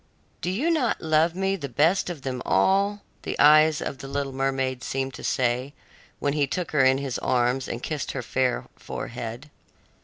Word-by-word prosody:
"Do 175 - -1
you 260 - 0
not 290 -8 +1
love 160 +1 +2
me 195 +1 0
the 145 -7 -6
best 165 +10 +2
of 160 -6 -6
them 130 -2 -3
all?" 200 - +2 0.2
the - - -4
eyes 155 +1 +6
of 135 - -5
the 135 - -7
little 140 0 -3
mermaid 135 -1 -1
seemed 135 0 -2
to - - -9
say 125 +3 0 0.4
when 140 - -1
he 145 -2 +1
took 175 +4 -3
her 150 -3 +3
in 130 0 +5
his 135 -3 -3
arms 125 +1 +1
and 120 - -5
kissed 150 -3 -3
her 130 - -4
fair 125 +1 0
forehead. 120 +4 -7
140 Hz, 185 wpm, -25 LUFS, 130-160 Hz, 0.4 s, eyes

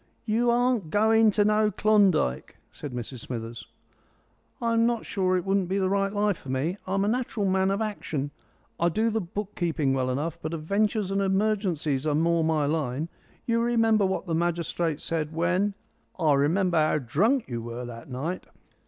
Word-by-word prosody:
"You 235 +2 +2
aren't 240 -6 +1
going 220 +3 +4
to 205 0 +2
no 215 0 +3
Klondike," 195 - +2
said 145 - -8
Mrs 125 +1 -6
Smithers. 115 -1 -6 0.9
"I'm 230 0 +2
not 235 -2 -1
sure 185 -2 +1
it 180 - -3
wouldn't 195 -2 +1
be 195 - 0
the 190 -1 +1
right 195 0 +1
life 205 -2 +1
for 135 - -12
me. 150 +9 -1
I'm 195 +1 +1
naturally 220 -2 -1
a - - +1
man 190 0 +2
of 200 +3 0
action. 155 -9 -3 0.5
I 170 - +3
do 220 +7 +1
the 220 0 0
book 200 +3 -5
keeping 160 -6 0
well 130 -1 0
enough, 155 +6 -2
but 160 +2 -3
adventures 200 +5 0
and 195 0 +1
emergencies 190 -8 0
are 150 - +1
more 165 +1 +2
my 160 -2 +1
line. 150 0 -1 0.4
You 230 0 +1
remember 225 -3 +3
what 190 - -2
the 170 - -3
magistrate 170 -1 -1
said 160 -1 -3
when 180 +4 +1 0.2
" - - -42
"I 155 -4 +4
remember 170 +6 +2
how 155 0 +2
drunk 200 - +1
you 120 -2 -4
were 120 +2 -6
that 115 0 -9
night." 150 +8 -4
185 Hz, 180 wpm, -26 LUFS, 155-210 Hz, 0.9 s, going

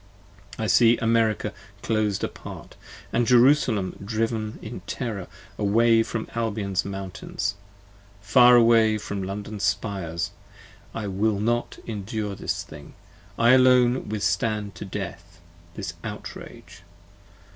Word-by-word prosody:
I - - -2
see 120 -1 +5
America 115 -2 +1 0.3
clos'd 105 -3 0
apart, - - -7 0.3
& - - -24
Jerusalem 120 -3 +3
driven 110 0 -2
in 110 -1 -7
terror 110 -8 -4 0.3
70 - - -26
Away 115 +1 +5
from 110 0 -3
Albion's 105 -4 -1
mountains, 95 0 -4 0.7
far 120 +4 +6
away 115 -2 +5
from 100 -1 -5
London's 100 +2 -5
spires: 95 -4 -2 0.6
I 115 - -3
will 100 +1 0
not 120 +3 -1
endure 105 -1 -4
this - - -3
thing: 75 -1 -13 0.4
I 115 +1 +5
alone 125 -1 +4
withstand 105 0 -1
to 85 - -8
death, 90 -3 -7 0.4
This - - -5
outrage! - - -9
110 Hz, 115 wpm, -25 LUFS, 100-115 Hz, 0.7 s, far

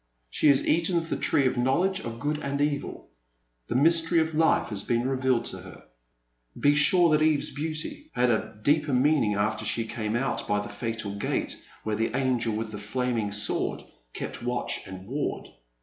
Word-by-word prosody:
She - - +2
has 140 -2 +4
eaten 170 +2 +2
of 165 0 -2
the - - 0
tree 140 - +2
of 130 - +1
knowledge 170 +10 +2
of 115 -8 -6
good 150 +3 -1
and 140 -1 -3
evil. 145 -1 -2 0.6
The - - -3
mystery 165 +4 +4
of 160 0 0
life 160 -4 +2
has 100 -2 -4
been 120 +3 0
re 135 - 0
vealed 130 -2 +1
to - - -7
her. - - -12 0.8
Be 145 - +4
sure 165 +3 +4
that 150 0 +3
Eve's 155 -1 +2
beauty 155 - -5
had 125 0 +3
a 110 -1 -2
deeper 150 +1 +2
meaning 130 -5 +3
after 105 +1 0
she 115 +1 -1
came 110 -1 -3
out 120 -2 -1
by 105 - +1
the 105 - -5
fatal 110 -2 -4
gate 100 - -2 0.3
where 110 -1 -1
the 115 +3 -1
angel 125 -4 0
with 110 0 -3
the 105 - -6
flaming 115 0 -2
sword 105 0 -2 0.3
kept - - -6
watch 125 +1 -3
and 95 0 -9
ward. 140 +7 -3
130 Hz, 190 wpm, -27 LUFS, 110-150 Hz, 0.8 s, has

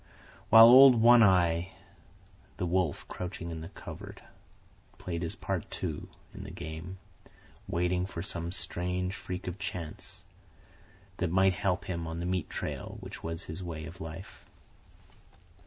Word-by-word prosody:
While 110 +1 +10
old 130 +2 +9
One 120 +1 +7
Eye, 90 -3 +3 0.8
the 90 - -2
wolf 90 -3 0
crouching 90 -2 -6
in 80 -1 -6
the 80 - -8
covert, - - -10 0.8
played 85 -2 -4
his 85 -2 -3
part, - - -4
too, 80 -5 -4 0.3
in - - -8
the - - -8
game, 80 +5 -7 0.7
waiting 90 +1 0
for 85 -3 -6
some 85 -2 -4
strange 90 0 -2
freak 90 -1 -6
of 90 +2 -5
Chance, 90 -5 -6 0.9
that 90 - -1
might 95 +2 +4
help 90 +2 -1
him 85 -2 -4
on 80 +1 -5
the 85 - -3
meat 90 -2 -2
trail - - -5
which - - -9
was 80 +1 -5
his 80 +4 -7
way 80 -3 -6
of 85 +3 -10
life. 80 +4 -9
90 Hz, 145 wpm, -30 LUFS, 85-95 Hz, 0.9 s, While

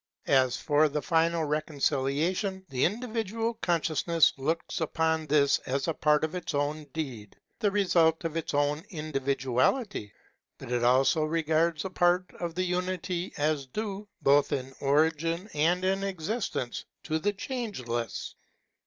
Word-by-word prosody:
As 130 -2 +4
for 150 0 +3
the 150 +1 -1
final 165 0 +2
reconciliation, 155 +5 -1
the 130 -2 +1
indi 220 +7 -1
vidual 225 0 -2
consciousness 165 -1 +2
looks 160 +5 -2
upon 160 0 0
this 145 -1 +4
as 135 +3 -1
in 165 - +1
part 150 0 +2
its 165 0 -3
own 150 +2 -1
deed, 130 -8 -6 0.2
the 210 - +2
result 175 -5 +3
of 165 -1 -2
its 165 - -2
own 145 +2 +1
individuality; 135 - -1 0.5
but - - -9
it 120 -1 +1
also 130 +6 +4
regards 160 +1 +1
a 190 - -4
part 180 0 +3
of 170 -2 -4
the 185 - 0
unity 180 0 -2
as 145 -2 0
due, 205 - -4 0.2
both 140 +1 +4
in 135 0 -3
origin 160 +5 +1
and 175 +5 +2
in 195 +1 +1
existence, 195 - -3 0.2
to 160 0 -1
the 205 +6 +1
Change 220 - -5
less. 120 -1 -3
160 Hz, 145 wpm, -28 LUFS, 145-180 Hz, 0.5 s, As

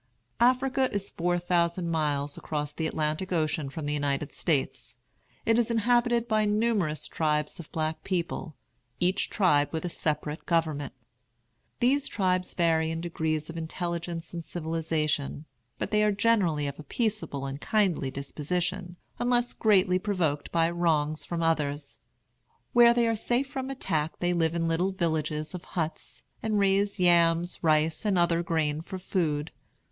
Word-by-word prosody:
Africa 260 +2 +3
is 200 -1 -3
four 175 +1 0
thousand 170 0 0
miles 145 -3 0
across 150 -1 -3
the 160 +1 -2
Atlantic 155 +4 -2
Ocean 155 -4 0
from 145 +2 -6
the 145 - -1
United 145 0 -1
States. 135 -6 -1 0.5
It 225 +1 +4
is 235 - +1
inhabited 235 +1 +2
by 215 -1 +2
numerous 210 -7 +1
tribes 150 -1 -1
of 165 - -10
black 155 0 -2
people, 170 -3 -3 0.4
each 180 +2 +1
tribe 150 -7 +3
with 160 +1 -3
a - - -1
separate 150 -1 -2
government. 155 -5 0 0.9
These 270 +3 +3
tribes 185 -2 0
vary 160 -2 +2
in 165 0 -3
degrees 160 -2 -2
of 165 - -7
intelligence 170 0 -4
and 170 -1 -4
civilization; 160 -3 -2 0.3
but - - -3
they 210 0 +3
are 210 - +4
generally 195 -8 +2
of 140 0 -5
a - - -7
peaceable 205 - -2
and 135 +1 -5
kindly 190 -10 +1
disposition, 175 +7 -3 0.2
unless 245 0 +1
greatly 190 -4 +3
provoked 175 -8 -1
by 165 -1 +3
wrongs 155 -3 0
from 170 -1 -2
others. 145 -3 -1 0.7
Where 235 -1 +7
they 235 -1 +3
are 225 - +2
safe 240 +5 0
from 265 -1 -4
attack 165 - -2
they 175 0 0
live 165 -1 +1
in 165 -1 0
little 175 +4 +1
villages 155 -3 -1
of 180 -1 -6
huts, 160 -3 -4 0.2
and 220 -2 0
raise 200 0 +2
yams, 175 -1 +3
rice, 155 0 +2
and 205 -3 +1
other 170 -1 +3
grain 160 -3 0
for 185 +3 -7
food. 160 -5 -1
170 Hz, 150 wpm, -28 LUFS, 155-195 Hz, 0.9 s, Where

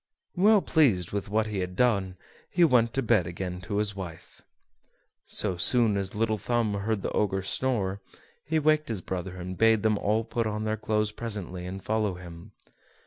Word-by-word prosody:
Well 205 +1 +5
pleased 125 - +2
with 100 0 -3
what 110 +1 +1
he 105 -2 -3
had 90 0 -4
done, 100 -6 +1 0.3
he 175 - +3
went 125 -7 +4
to 135 - +1
bed 110 -7 +3
again 90 +1 -5
to 100 +2 -3
his 105 -1 0
wife. 85 -4 -9 0.9
So 95 -4 0
soon 115 +3 +3
as 100 0 -3
Little 110 0 0
Thumb 120 -2 0
heard 100 +1 -2
the - - -2
Ogre 95 -2 0
snore, 100 -3 -1 0.4
he 160 +3 0
waked 155 -1 +2
his 110 -5 -2
brothers, 90 0 -5
and 90 +1 -6
bade 115 -1 +4
them 110 -2 +2
all 110 +2 +1
put 115 0 -2
on 105 0 -3
their 110 0 0
clothes 110 0 0
presently 100 -6 -6
and 95 +1 -7
follow 105 -3 0
him. 85 -1 -11
105 Hz, 185 wpm, -27 LUFS, 95-115 Hz, 0.9 s, Well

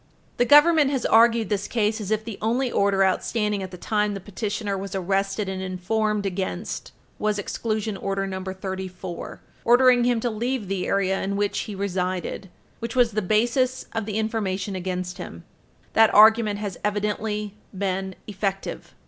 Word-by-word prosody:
The 245 - +3
Government 295 +1 +6
has 270 -3 -1
argued 230 -1 +5
this 205 -1 -1
case 220 -1 0
as 200 - -5
if 215 0 0
the 225 -4 -6
only 240 +4 0
order 195 -1 +3
outstanding 210 +2 0
at 190 - -5
the 180 - -9
time 210 +2 0
the - - -4
petitioner 205 +1 -3
was 195 0 -5
arrested 195 +2 0
and 190 0 -3
informed 205 +3 -1
against 190 +1 -3 0.3
was 210 -1 0
Exclusion 215 +1 -2
Order 195 0 -2
No. 190 -1 -4
34, 190 -1 -6 0.2
ordering 245 0 +5
him 245 -2 +2
to 240 +1 -1
leave 235 0 -2
the 190 -1 -2
area 195 -1 +1
in 200 +1 -2
which 205 0 0
he 210 - -5
resided, 185 -1 -3 0.3
which 230 0 -5
was 245 -2 +4
the 215 +1 0
basis 240 +6 +1
of 225 -2 -2
the 215 -1 -2
information 205 -3 -2
against 180 0 -4
him. 85 - -8 0.5
That 225 -1 +6
argument 215 -1 +6
has 205 -3 -5
evidently 210 0 -1 0.2
been 190 -1 -2
effective. 195 -1 -4
205 Hz, 165 wpm, -24 LUFS, 190-225 Hz, 0.5 s, Government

